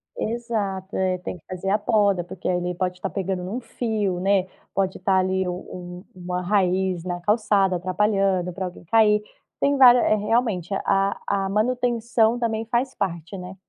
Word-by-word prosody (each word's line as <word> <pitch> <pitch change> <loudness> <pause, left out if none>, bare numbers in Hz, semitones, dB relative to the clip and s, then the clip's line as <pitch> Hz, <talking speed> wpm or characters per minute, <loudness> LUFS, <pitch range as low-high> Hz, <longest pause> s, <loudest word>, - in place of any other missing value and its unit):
Exato, 215 - -3
é 185 -1 +1
tem 180 - -6
que 155 - -24
fazer 185 +1 -4
a 210 - +4
poda, 205 -4 +2
porque 175 +1 -7
ele 180 -1 -1
pode 180 0 -2
estar 195 +1 -3
pegando 190 -2 -3
num 210 +8 -4
fio, 220 -6 -2
né? 195 0 +2 0.3
Pode 190 -1 0
estar 190 -1 +1
ali 185 0 +1
o - - -1
um 180 0 -8
uma 180 0 -4
raiz 185 -2 +1
na 175 -1 -3
calçada 200 -2 +2
atrapalhando 185 -1 +1
pra 185 +1 -4
alguém 180 -1 -8
cair. 210 +1 +4 0.4
Tem 280 0 +2
vária 250 -2 +8
eh 215 - +3
realmente 210 -4 0 0.2
a 195 0 +1
a 195 -1 0
manutenção 235 +1 +1
também 225 -2 -1
faz 255 +2 0
parte, 170 -1 -3
né? 180 +1 -8
195 Hz, 170 wpm, -23 LUFS, 180-220 Hz, 0.4 s, vária